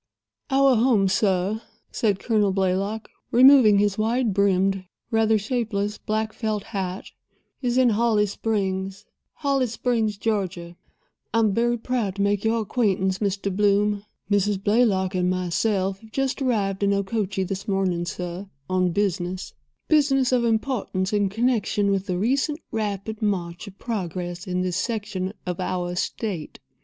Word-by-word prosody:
"Our 270 -2 +4
home, 225 -4 +3
sir," 190 +2 +1 0.3
said 205 -4 +1
Colonel 210 -1 +1
Blaylock, 195 +3 -1 0.2
removing 250 -4 +7
his 205 0 +1
wide 230 0 +1
brimmed, 195 -1 +2 0.3
rather 220 -1 +3
shapeless 210 -2 -2
black 215 0 -2
felt 215 -3 -2
hat, 190 -3 -5 0.5
"is 245 -1 0
in 255 -2 +5
Holly 220 -1 +2
Springs—Holly 205 +7 -2
Springs, 225 -2 -1
Georgia. 185 -5 -2 0.6
I - - +4
am 215 -3 +2
very 240 +2 +1
proud 225 -5 -2
to 200 - 0
make 200 0 +1
your 225 +1 +1
acquaintance, 190 -4 0
Mr. 200 -2 -1
Bloom. 205 0 +2 0.3
Mrs. 200 -1 +1
Blaylock 205 -4 +2
and 180 -1 +1
myself 190 +2 0
have 220 +1 -17
just 270 +2 -1
arrived 205 -7 0
in 200 0 +3
Okochee 200 -1 -1
this 195 +1 -5
morning, 190 -3 0
sir, 180 +2 -5 0.2
on 185 -1 +1
business—business 205 - 0
of 250 -2 +3
importance 220 -5 -1
in 205 -2 +2
connection 215 -2 +1
with 195 0 -1
the 180 -2 -1
recent 275 - 0
rapid 215 0 -3
march 180 -3 -2
of 195 0 -11
progress 180 -4 -4
in 180 0 -1
this 180 -1 -1
section 200 -3 -2
of 180 0 -3
our 180 -1 -2
state." 180 -2 -3
205 Hz, 140 wpm, -24 LUFS, 190-225 Hz, 0.6 s, removing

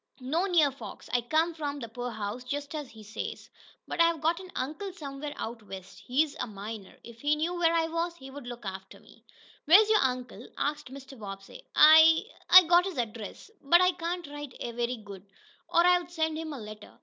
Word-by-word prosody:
"No 305 +8 0
near 320 -6 +4
folks. 275 - -10
I 245 - +3
come 315 +7 +1
from 290 -3 -4
th' 230 -3 -8
poorhouse, 235 -1 -5
just 285 +3 -5
as 295 -4 -5
he 220 -1 -13
says. 210 +1 -7 0.4
But - - 0
I've 335 -1 +3
got 330 +3 +1
an 370 -1 -10
uncle 310 +10 -4
somewhere 290 -2 -7
out 230 0 -6
west. 190 -3 -10
He's 285 +4 0
a - - -2
miner. 205 -1 -8
If 235 -1 -13
he 295 +1 +2
knew 320 +4 -1
where 345 -2 +2
I 330 -1 +2
was, 335 +1 -2
he'd 265 -4 -12
look 245 -4 -9
after 190 0 -7
me." - - -20 0.4
"Where 345 +7 +9
is 435 0 +3
your 430 - +5
uncle?" 250 -3 -2
asked 295 -2 -2
Mr. 270 -1 -11
Bobbsey. 195 -2 -9
"I 320 +1 +8 0.3
I 370 0 +11
got 350 +1 +4
his 380 -5 -5
address, 230 - -5
but 340 +5 +5
I 365 0 +4
can't 350 0 -4
write 290 -2 -9
very 240 +1 -3
good, 200 -3 -11 0.5
or 340 - +4
I'd 355 -1 +3
send 320 -2 -1
him 315 0 -5
a 285 - -6
letter." 210 -1 -11
285 Hz, 200 wpm, -29 LUFS, 235-330 Hz, 0.5 s, I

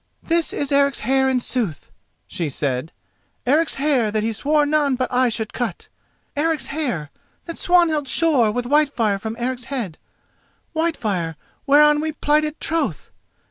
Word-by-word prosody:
"This 335 -1 +1
is 285 -1 -2
Eric's 280 -1 +3
hair 265 +3 +2
in 260 -1 +2
sooth," 230 - -3 0.3
she 165 -4 -3
said—"Eric's 155 - -2
hair 270 -6 +2
that 210 0 -1
he 225 +1 -1
swore 295 +6 +2
none 290 -2 +2
but 255 0 -2
I 250 0 +3
should 220 -1 -4
cut! 230 -8 -4 0.5
Eric's 310 0 0
hair 245 - -2 0.3
that 335 - -6
Swanhild 330 -5 +3
shore 280 -7 +3
with 240 +3 -2
Whitefire 250 -7 +2
from 220 +2 -5
Eric's 245 0 -3
head—Whitefire 225 - -4 0.3
whereon 295 +1 +6
we 315 0 -2
plighted 300 +1 0
troth! 330 +1 -2
265 Hz, 140 wpm, -21 LUFS, 225-300 Hz, 0.5 s, whereon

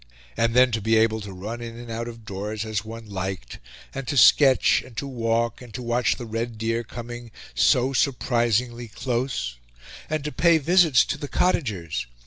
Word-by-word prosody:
And 115 0 +1
then 125 0 +6
to 110 -1 -1
be 110 +2 +2
able 110 0 +2
to 100 -1 -7
run 105 +6 -6
in 115 -1 -7
and 120 -1 -9
out 115 +1 -4
of 115 -2 -10
doors 105 +2 -4
as 110 -2 -2
one 115 +1 -9
liked, 95 - -5 0.3
and 135 -2 -6
to 140 - -1
sketch, 135 +2 +6
and 125 -3 -15
to 140 - -2
walk, 115 -3 -1
and 125 -2 -11
to 125 - -5
watch 120 0 +1
the 120 - -7
red 115 +1 -4
deer 115 +1 -1
coming 120 +1 -8 0.2
so 125 - +3
surprisingly 120 -3 0
close, 120 - -3 0.5
and 155 -1 -1
to 150 - -3
pay 170 +1 +4
visits 160 -3 +4
to 145 - -3
the 145 - -5
cottagers! 95 - -1
115 Hz, 185 wpm, -24 LUFS, 110-125 Hz, 0.5 s, then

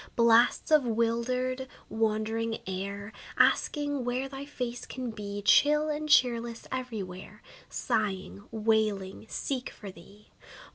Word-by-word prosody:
Blasts 235 +4 +4
of 305 -2 +6
wildered, 250 +3 0 0.2
wandering 225 +1 0
air, 200 +2 -5 0.2
Asking 290 -3 +2
where 250 +2 -1
thy 270 +1 -7
face 245 -4 -5
can 255 -2 -5
be, 205 -1 -6
Chill 300 +7 +5
and 305 0 -3
cheerless, 235 -4 +3
every 250 -5 -3
where, 185 +1 -10 0.3
Sighing, 205 -1 -2
wailing, 215 -3 0
seek 260 -3 -3
for 200 -2 -9
thee. 195 +4 -17
230 Hz, 115 wpm, -29 LUFS, 210-255 Hz, 0.3 s, of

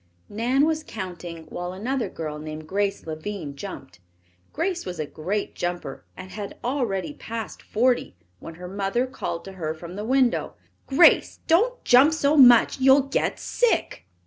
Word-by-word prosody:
Nan 245 +7 +2
was 315 0 0
counting 175 - -7
while 175 +1 -5
another 245 +6 -2
girl 155 -2 -6
named 155 0 -7
Grace 200 +2 -1
Lavine 160 -1 -5
jumped, 140 - -9 0.5
Grace 350 +2 -2
was 180 -2 -6
a 155 - -1
great 185 +8 -3
jumper 175 -6 -4
and 185 0 -9
had 205 -1 -7
already 205 - -1
passed 225 +5 -7
forty 245 - 0 0.2
when 165 - -9
her 180 +2 -8
mother 200 +6 -1
called 255 -10 -5
to 195 - -8
her 155 0 -2
from 170 +3 -9
the 205 - -4
window. 255 +1 +1 0.3
"Grace, 280 +6 +5
don't 465 +10 +2
jump 270 +6 +6
so 300 -1 +2
much. 245 -3 +7
You'll 265 +1 +6
get 275 - -1
sick." 485 -2 0
205 Hz, 155 wpm, -24 LUFS, 175-265 Hz, 0.5 s, much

